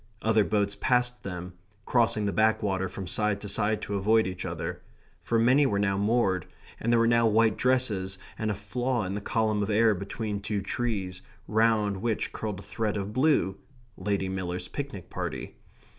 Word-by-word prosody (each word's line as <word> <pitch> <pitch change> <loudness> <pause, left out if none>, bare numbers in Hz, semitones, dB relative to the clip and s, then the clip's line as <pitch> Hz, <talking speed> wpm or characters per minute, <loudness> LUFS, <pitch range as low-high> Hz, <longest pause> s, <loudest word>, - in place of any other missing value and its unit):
Other 110 -1 +4
boats 100 -1 0
passed 125 +1 +1
them, 90 -1 -6 0.3
crossing 115 -3 +2
the 100 - +1
backwater 100 -2 +2
from 95 - -6
side 105 +3 0
to 105 - -6
side 105 +1 0
to 105 - -4
avoid 110 +3 +3
each 95 0 -4
other, - - -4 0.4
for 115 - 0
many 130 +5 +5
were 100 - 0
now 100 -1 +1
moored, 100 -3 +1 0.3
and 115 - 0
there 120 - +5
were 115 - +4
now 115 0 +4
white 110 0 +4
dresses 110 -7 0 0.2
and 110 - -2
a 105 - 0
flaw 120 +4 -1
in 95 0 -3
the 100 - -3
column 110 0 +1
of 100 - -1
air 110 +1 +4
between 100 +2 -4
two 100 0 -2
trees, 100 -5 -2 0.3
round 110 -2 +2
which 110 +2 -2
curled 105 -3 -4
a - - -10
thread 110 -2 -2
of 100 +1 -4
blue 130 -8 +2 0.4
Lady 100 0 -1
Miller's 90 -1 -3
picnic 135 - -6
party. - - -4
105 Hz, 180 wpm, -28 LUFS, 100-115 Hz, 0.4 s, many